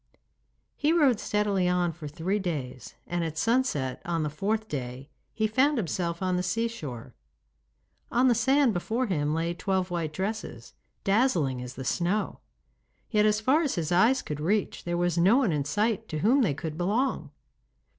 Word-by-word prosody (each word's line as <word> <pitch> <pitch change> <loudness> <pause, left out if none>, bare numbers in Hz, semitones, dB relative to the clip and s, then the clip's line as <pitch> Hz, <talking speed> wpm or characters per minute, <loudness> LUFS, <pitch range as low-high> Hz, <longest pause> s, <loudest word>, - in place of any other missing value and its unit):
He 295 +2 +1
rode 280 -10 +4
steadily 205 -3 +1
on 180 -1 +1
for 160 -1 -8
three 175 +7 -2
days, 135 - -5
and 175 0 -2
at 160 -1 -4
sunset 195 - 0
on 165 -2 -1
the 150 - -2
fourth 215 +7 -1
day 130 - -6 0.2
he 220 - -1
found 265 +7 +2
himself 170 -3 -2
on 185 -1 +1
the - - 0
seashore. 180 - -3 1.0
On 250 +2 +3
the 245 - +5
sand 265 +2 +3
before 225 +8 -1
him 150 -7 0
lay 165 +1 -1
twelve 185 0 -1
white 165 -3 -2
dresses, 195 +7 -5 0.3
dazzling 190 - +2
as 125 +1 -7
the 130 - -6
snow, 180 - -1 0.7
yet 210 -2 +4
as 210 0 +2
far 265 +8 +3
as 295 -5 -1
his 165 -3 -2
eyes 225 +9 +4
could 150 -1 -5
reach 195 +6 -1
there 175 0 -1
was 175 -1 +1
no 195 +8 +5
one 255 -9 +2
in 145 -3 -1
sight 220 +6 0
to 155 - -4
whom 265 +5 +5
they 160 - +1
could 155 +1 -5
belong. 220 +9 0
185 Hz, 175 wpm, -27 LUFS, 160-225 Hz, 1.0 s, the